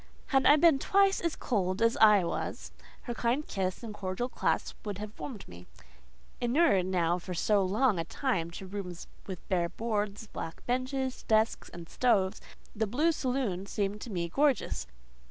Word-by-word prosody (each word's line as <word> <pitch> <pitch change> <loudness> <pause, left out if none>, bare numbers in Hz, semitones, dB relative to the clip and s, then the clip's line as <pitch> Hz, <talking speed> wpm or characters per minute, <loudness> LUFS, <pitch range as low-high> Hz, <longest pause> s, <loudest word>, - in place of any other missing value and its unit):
Had 270 -1 +4
I 295 - +8
been 305 -2 +5
twice 390 +3 +3
as 335 -2 -1
cold 185 -5 -1
as 230 0 +3
I 210 -3 +7
was, 170 - -4 0.3
her 240 - -4
kind 240 +6 0
kiss 190 +2 -2
and 220 -2 -6
cordial 200 +5 -3
clasp - - -1
would 205 -3 -4
have 210 +1 -8
warmed 235 -8 -7
me. 90 0 -12 0.7
Inured 240 - +3
now 175 -1 +1
for 180 +1 -6
so 205 +4 +2
long 210 +1 +2
a - - 0
time 175 - -1
to 190 - -7
rooms 185 -3 -6 0.2
with 185 -3 -7
bare 175 -3 +1
boards, 210 -1 -2
black 165 -5 -7
benches, 255 +1 -1
desks, 220 +1 +1
and 170 -1 -10
stoves, 205 -4 +1 0.3
the 220 0 0
blue 295 +10 +2
saloon 250 - -2
seemed 205 0 -2
to - - -7
me 175 -4 -2
gorgeous. 280 - +1
210 Hz, 170 wpm, -30 LUFS, 185-255 Hz, 0.7 s, I